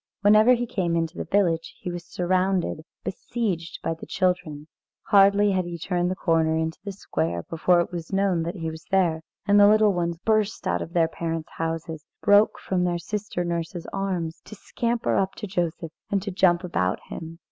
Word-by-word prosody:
Whenever 215 +4 +6
he 245 0 -2
came 185 -8 -1
into 165 -1 -1
the - - -4
village, 170 -5 +1
he 180 - -5
was 175 0 -6
surrounded, 185 -1 0 0.2
besieged 185 -5 -3
by 165 - 0
the 160 - -10
children. 180 -6 -1 0.4
Hardly 200 0 +5
had 185 -2 0
he 175 -1 -5
turned 175 +1 -1
the 185 - -1
corner 160 -3 +1
into 160 +1 -2
the 200 - -4
square, 85 - -3
before 175 +2 +2
it 170 - -4
was 170 -2 -6
known 195 -3 +1
that 170 +3 -3
he 165 -3 -4
was 160 +1 -10
there, 175 -4 +2 0.2
and 205 0 +5
the 205 - +8
little 215 -1 +5
ones 170 -1 -1
burst 215 +2 0
out 85 0 0
of 170 - -7
their 165 -2 +3
parents' 165 0 -4
houses, 165 -1 -4 0.2
broke 205 +1 +4
from 185 -2 -1
their 175 -1 0
sister 195 +1 -3
nurse's 170 0 -3
arms, 185 -5 -3
to 215 - -10
scamper 235 +3 -1
up 190 0 0
to 215 - -6
Joseph 175 -4 -2 0.2
and 200 - +1
to 200 - -4
jump 180 -1 +3
about 95 - 0
him. 165 0 -7
175 Hz, 190 wpm, -25 LUFS, 165-200 Hz, 0.4 s, the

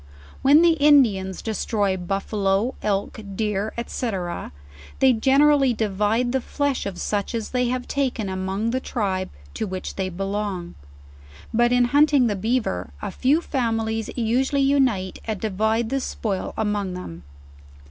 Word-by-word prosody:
When 290 +5 +6
the 340 -1 +6
Indians 230 -11 +4
destroy 205 -2 0
buffaloe. 195 +4 -1
elk, 200 +1 -1 0.2
deer, 210 0 -1
&c. 240 -1 -3 0.9
they 265 -1 +5
generally 270 +2 +4
divide 215 +3 0
the 265 0 0
flesh 285 -3 -1
of 190 -3 -6
such 205 +2 -2
as 225 -2 -3
they 250 -1 +1
have 250 0 -2
taken 260 -7 -1
among 190 +4 -2
the 260 - 0
tribe 195 -7 -2 0.2
to - - -3
which 185 -1 -6
they 190 -1 -1
belong. 195 -1 -3 0.8
But 240 +1 +3
in 245 0 +4
hunting 290 -3 +5
the 210 -3 +1
beaver, 205 - -1
a - - -4
few 275 - +2
families 225 -6 -1
usually 260 +4 +1
unite 260 -9 +1
and 220 -3 -3
divide 220 +3 0
the 275 - 0
spoil 205 -6 -3
among 205 -4 -1
them. 85 - -8
220 Hz, 140 wpm, -23 LUFS, 195-255 Hz, 0.9 s, When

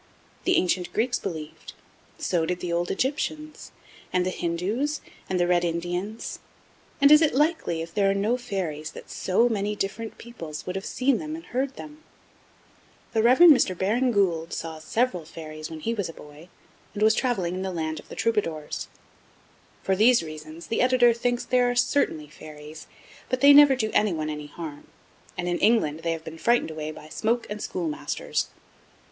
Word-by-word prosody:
The 365 - +4
ancient 180 0 0
Greeks 245 +3 +1
believed, 160 -5 -7 0.4
so 175 -3 0
did 180 0 -2
the 175 -1 -3
old 175 +1 0
Egyptians, 305 +5 -3 0.4
and 180 0 +1
the 185 - 0
Hindoos, 200 - -1 0.3
and 185 - 0
the 175 - +3
Red 175 0 +2
Indians, 175 +5 -3 0.6
and 280 0 +6
is 300 +1 +9
it 305 -5 +2
likely, 295 - +1
if 165 - -10
there 200 -2 +3
are - - +3
no 210 +5 +1
fairies, 175 -10 -4
that - - -11
so 195 +6 +2
many 210 -2 -1
different 210 +3 -4
peoples 165 -10 -8
would 180 - -4
have 195 - -4
seen 260 -1 +1
and 315 +1 -6
heard 265 +2 -2
them? 305 0 -10 1.1
The 220 - +3
Rev. 245 +7 +4
Mr. 280 - +7
Baring 230 +8 +1
Gould 175 -6 +1
saw 160 -1 -5
several 185 +2 0
fairies 155 -1 -8
when 160 -1 -8
he 230 - -1
was 200 -6 -2
a - - -8
boy, 150 +4 -14 0.5
and 210 - 0
was 220 0 +6
travelling 220 -9 0
in 185 - -3
the 190 - -2
land 160 -3 -3
of - - -15
the - - -8
Troubadours. 165 -10 -1 1.0
For 190 - +1
these 230 +1 +5
reasons, 155 +1 -9
the 225 - -1
Editor 250 -1 +5
thinks 245 +1 -1
that - - -18
there 250 -1 +4
are 245 - -1
certainly 245 - +1
fairies, 155 0 -11 0.4
but 255 - -1
they 285 +1 +9
never 285 -1 +8
do 220 -4 -1
anyone 160 -7 +1
any 150 -1 -6
harm; 150 -1 -8 0.5
and, 180 0 -2
in 175 0 0
England, 200 -9 +3
they 165 0 -1
have 165 -1 -7
been 160 0 -9
frightened 235 -6 +2
away 155 -1 -5
by 155 0 -10
smoke 230 +8 -1
and 210 0 -4
schoolmasters. 165 -5 -2
190 Hz, 180 wpm, -26 LUFS, 165-245 Hz, 1.1 s, is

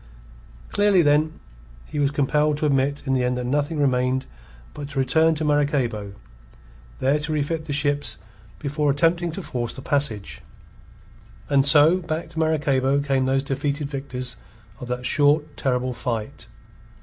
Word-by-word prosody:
Clearly, 205 -3 +4
then, 150 +2 +2 0.5
he 150 - -5
was 140 -1 +2
compelled 150 +1 +1
to 150 - -1
admit 140 0 +1
in 135 - 0
the 130 -1 +1
end 125 0 0
that 125 - -3
nothing 145 +4 -1
remained 130 -1 +1 0.5
but 145 -1 -7
to 145 - -7
return 160 +5 +3
to 155 0 -3
Maracaybo, 130 -9 0 0.8
there 140 +3 +1
to 155 +1 -4
refit 155 +1 -2
the 155 - -6
ships 145 0 0 0.4
before 150 0 -1
attempting 170 +4 +2
to 195 - -6
force 120 -5 -3
the 130 - -10
passage. 125 -8 -1 1.1
And 140 -2 +4
so, 150 +6 +6
back 160 -1 -4
to 165 -1 -6
Maracaybo 140 -3 +1
came 135 -2 0
those 135 0 +1
defeated 140 +1 -3
victors 125 -3 -3 0.4
of 125 - -7
that 125 0 -4
short, 150 +2 +2
terrible 125 -1 -1
fight. 115 -2 -4
145 Hz, 150 wpm, -23 LUFS, 130-150 Hz, 1.1 s, so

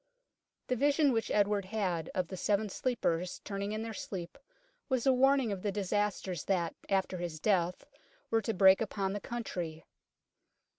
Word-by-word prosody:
The 255 - 0
vision 285 +3 +3
which 225 -2 0
Edward 205 -1 +2
had 185 -6 -2
of 185 -2 0
the 190 - -5
Seven 205 +3 +1
Sleepers 180 -7 -1
turning 200 0 -3
in 215 +1 -2
their 225 0 -5
sleep 185 +3 -6 0.5
was 260 -3 +1
a 265 - +6
warning 265 -2 +4
of 195 -2 -3
the 205 - -1
disasters 200 -3 -1
that 175 -4 0 0.2
after 190 -1 +1
his 170 -3 -4
death 180 -2 +1 0.5
were 225 - +3
to 225 - -1
break 190 +2 +7
upon 195 -3 -1
the 205 - -2
country. 175 -9 -5
200 Hz, 160 wpm, -32 LUFS, 185-225 Hz, 0.5 s, break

